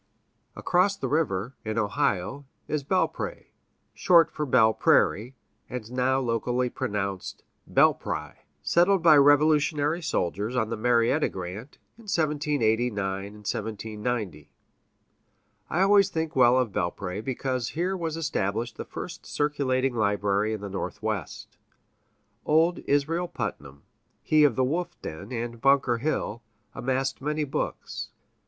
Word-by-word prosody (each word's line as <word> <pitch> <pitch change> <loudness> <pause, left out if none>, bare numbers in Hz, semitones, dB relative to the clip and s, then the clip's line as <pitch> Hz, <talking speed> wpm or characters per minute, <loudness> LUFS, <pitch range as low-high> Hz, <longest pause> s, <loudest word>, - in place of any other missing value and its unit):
Across 190 +3 +2
the - - -3
river, 130 -6 -1
in 110 0 -3
Ohio, 105 +5 -1 0.2
is 150 -2 -2
Belpré 190 - -2 0.4
(short 165 -3 +4
for 150 -1 -3
Belle 115 -3 +5
Prairie, 120 +5 +2 0.3
and 120 -2 -6
now 130 +1 +1
locally 120 0 -1
pronounced 100 -2 -4 0.3
Bel'pry), - - +1 0.3
settled 175 +1 +3
by 160 -3 +8
Revolutionary 150 +2 +4
soldiers, 105 - -2
on 110 -2 0
the - - 0
Marietta 120 +5 +2
grant, 95 +9 -7 0.2
in 230 - -15
1789 115 - -1 0.6
90. 105 - -3 1.2
I 175 - 0
always 200 0 +5
think 160 -3 -3
well 125 -1 +5
of 125 -4 +1
Belpré, 90 +2 -3
because 130 -1 -2
here 180 +4 -1
was 165 -3 -3
established 115 -7 -2
the - - -5
first - - -8
circulating 135 -3 0
library 105 -1 +1
in 110 -2 -4
the 100 - -5
Northwest. 95 - -5 0.9
Old 165 +3 +3
Israel 160 +5 +1
Putnam, 70 - -6 0.4
he 155 -1 +4
of 135 -6 +2
the 130 - +2
wolf 175 +6 -2
den 90 +8 -7
and 120 -1 -4
Bunker 135 -4 +3
Hill, 120 -5 -2 0.3
amassed 135 +1 -2
many 150 +2 -1
books. 135 - -4
130 Hz, 120 wpm, -26 LUFS, 110-150 Hz, 1.2 s, by